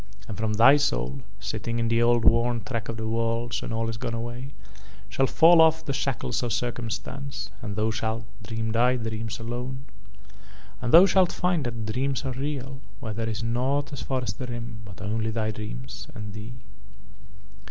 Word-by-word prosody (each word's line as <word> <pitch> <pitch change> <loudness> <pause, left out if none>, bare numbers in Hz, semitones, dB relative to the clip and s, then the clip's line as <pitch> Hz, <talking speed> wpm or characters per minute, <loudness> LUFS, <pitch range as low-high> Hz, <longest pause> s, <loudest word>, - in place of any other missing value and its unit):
But 100 -3 -6
from 110 0 0
thy 120 +7 +7
soul, 140 -1 0 0.2
sitting 110 +5 -3
in 115 -1 +1
the 115 +1 +3
old 120 -1 +4
worn 115 0 +4
track 115 +1 -4
of 115 - -3
the 110 0 -3
worlds 115 +1 0
when - - -5
all 115 0 0
is 115 0 -3
gone 115 +1 -3
away, 120 +3 -5 0.6
shall 135 +8 +2
fall 165 +3 +7
off 160 0 +4
the 140 - -1
shackles 135 -1 -1
of 120 -2 -1
circumstance 120 +4 -4
and 105 -3 -4
thou 110 +1 +1
shalt 110 0 -2 0.2
dream 110 0 -3
thy 120 +3 +4
dreams 110 -2 -3
alone. 125 +3 -5 1.0
"And 120 -1 -1
thou 170 +3 +10
shalt 190 -2 +4
find 180 -5 0
that 115 -2 -3
dreams 130 +5 -1
are 130 - -1
real 135 0 -4 0.2
where 110 -2 -4
there 115 +1 -2
is 110 +1 -3
nought 130 +6 0
as 140 - -5
far 130 -2 -1
as 105 -5 -2
the 125 +5 -6
Rim 120 -2 -6
but 95 -1 -9
only 110 +2 -1
thy 110 -1 -1
dreams 110 +4 -7
and 105 -2 -6
thee. 105 +3 -7
115 Hz, 185 wpm, -26 LUFS, 110-130 Hz, 1.0 s, thou